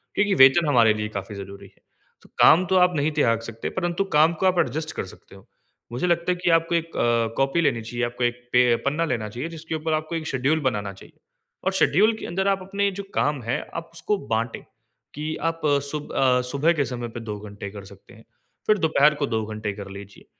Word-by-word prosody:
क्योंकि 205 0 +2
वेतन 135 +5 +7
हमारे 120 -6 +5
लिए 105 0 -3
काफ़ी 100 0 -6
ज़रूरी 100 0 -9
है। - - -27 0.4
तो - - -20
काम 180 +4 +7
तो 190 - +1
आप 180 0 +4
नहीं 145 +2 +1
त्याग 115 -7 +2
सकते 115 0 -6
परंतु 175 0 -1
काम 155 +3 +5
को - - +2
आप 180 -1 +2
एडजस्ट 155 +1 -1
कर - - -2
सकते 95 - -15
हो। 95 - -16 0.5
मुझे 125 +9 -1
लगता 170 +1 +1
है - - +1
कि - - +2
आपको 165 +1 +2
1 165 0 -2
अ, 115 -1 +1
कॉपी 135 +5 +2
लेनी 120 -8 +1
चाहिए, 120 +2 -3
आपको 120 +1 -4
एक 120 0 0 0.2
पे 125 -1 +5
पन्ना 150 +4 +1
लेना 115 -8 -2
चाहिए, 125 +9 -5
जिसके 160 -1 -6
ऊपर 160 0 -2
आपको 155 +2 -2
एक 160 -1 -4
शेड्यूल 140 +4 +1
बनाना 105 -4 -4
चाहिए। 95 - -17 0.5
और 190 - +2
शेड्यूल 195 +4 +3
के - - -7
अंदर 190 +3 -1
आप 195 -1 0
अपने 200 +1 0
जो - - -10
काम 145 -3 +1
हैं, 115 +2 -1 0.2
आप 165 0 -5
उसको 170 +5 -1 0.2
बाँटे 115 +1 -2 0.6
कि 155 +2 -3 0.2
आप 165 -1 -8
अ, 145 -1 +3
सुब 150 -1 -6
अ, 125 -1 +3
सुबह 150 +4 +2
के - - +1
समय 120 -1 -5
पे - - -5
2 105 - -5
घंटे 100 -1 -8
कर 100 -1 -10
सकते 100 +4 -19
हैं, 115 -1 -17 0.4
फिर 215 - +4
दोपहर 150 -2 +4
को - - +1
2 110 -3 -1
घंटे 110 -1 -4
कर 100 -1 -9
लीजिए, 100 0 -13
140 Hz, 230 wpm, -24 LUFS, 115-165 Hz, 0.6 s, वेतन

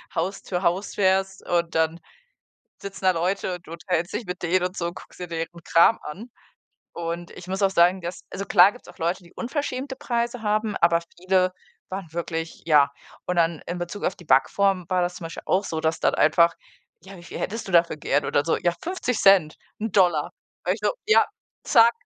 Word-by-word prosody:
Haus 195 +1 -2
zu 180 -1 -3
Haus 185 +4 0
fährst 190 0 +1
und 170 -1 0
dann 160 +1 +1 0.8
sitzen 195 -1 -7
da 185 - +6
Leute 180 +2 -1
und 175 - -13
du - - -11
unterhältst 170 +1 -2
dich 215 +2 -3
mit 180 0 -6
denen 180 +1 +2
und 185 - -14
so 170 - -1
und 175 - -6
guckst - - -13
dir 180 - -5
deren 165 -1 -3 0.2
Kram 170 +8 +5
an. 205 +11 -8 0.6
Und 170 +1 -5
ich 180 - -11
muss 190 +2 -3
auch 195 - +4
sagen, 180 0 +3
dass 170 0 -5
also, 200 - -4
klar 185 +1 +6
gibt's 245 - -16
auch - - -14
Leute, 170 +3 -1
die 170 - -18
unverschämte 265 0 -4
Preise 240 -3 -2
haben, 215 0 0
aber 170 0 +3 0.2
viele 185 +1 +2 0.4
waren 190 -1 -5
wirklich 165 -1 -4
ja. 145 -3 +5 0.4
Und 180 - -1
dann 165 -2 +1
in 175 +1 -4
Bezug 175 +4 -5
auf 180 - 0
die 175 - -14
Backform 185 +7 +3
war 185 - +2
das 175 0 -1
zum - - -8
Beispiel 165 - -7
auch 195 +2 +2
so, 160 -4 -3
dass 160 +1 0
dann - - +2
einfach 170 +2 +4 0.5
„ja, 190 +2 -12
wie 175 - -13
viel 170 - -8
hättest 225 +2 -4
du 190 - -6
dafür 170 -2 +4
gern?“ 145 -1 0
Und - - -3
dann 145 - +4
so: 165 - +1
„Ja, 175 0 0
50 320 - -2
Cent, 190 -6 +5 0.2
1 220 0 -2
Dollar.“ 175 -7 +3 0.3
War - - +2
ich - - -10
nur: - - +2
„Ja, 430 - +6 0.4
zack, 230 0 +6
180 Hz, 215 wpm, -24 LUFS, 170-195 Hz, 0.8 s, da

